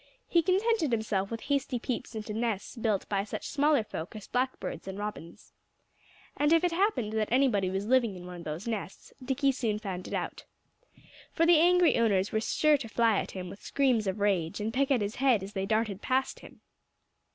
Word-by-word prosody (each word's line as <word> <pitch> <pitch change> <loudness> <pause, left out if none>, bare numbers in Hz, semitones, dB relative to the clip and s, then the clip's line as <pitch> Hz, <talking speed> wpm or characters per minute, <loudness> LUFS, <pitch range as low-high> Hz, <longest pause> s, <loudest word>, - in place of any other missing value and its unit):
He 340 - +3
contented 380 - +1
himself 210 -4 0
with 230 -1 -5
hasty 280 -2 -1
peeps 240 -1 -4
into 215 0 -5
nests 225 -1 -2
built 220 -4 -1
by 200 -1 0
such 205 - -6
smaller 295 -4 +2
folk 185 -1 -7
as 210 - -8
Blackbirds 255 -5 -3
and 190 0 -5
Robins. 205 -6 -7 0.8
And 295 +1 +2
if 330 0 +5
it 355 - +2
happened 335 - 0
that 220 -1 -1
anybody 240 -7 +3
was 195 +2 -2
living 235 -4 +2
in 180 -1 -9
one 180 0 -8
of 170 - -9
those 155 +7 -5
nests, 210 -4 -5
Dickie 275 +2 +1
soon 230 -5 -1
found 190 -4 -5
it - - -4
out. - - -4 0.9
For 330 - +3
the 335 -2 +6
angry 355 -3 +4
owners 200 -4 +2
were 220 - 0
sure 300 +6 +3
to 230 -4 -7
fly 225 -2 +3
at - - -5
him 185 -1 -5
with 195 +3 -10
screams 255 -7 +1
of 190 +2 -2
rage, 190 -5 0
and 215 +2 -2
peck 275 +1 +1
at 260 -5 +2
his 205 +2 -3
head 255 -7 +3
as 195 +2 -8
they 195 -1 -2
darted 215 -2 0
past 265 0 0
him. - - -15
225 Hz, 205 wpm, -29 LUFS, 200-270 Hz, 0.9 s, the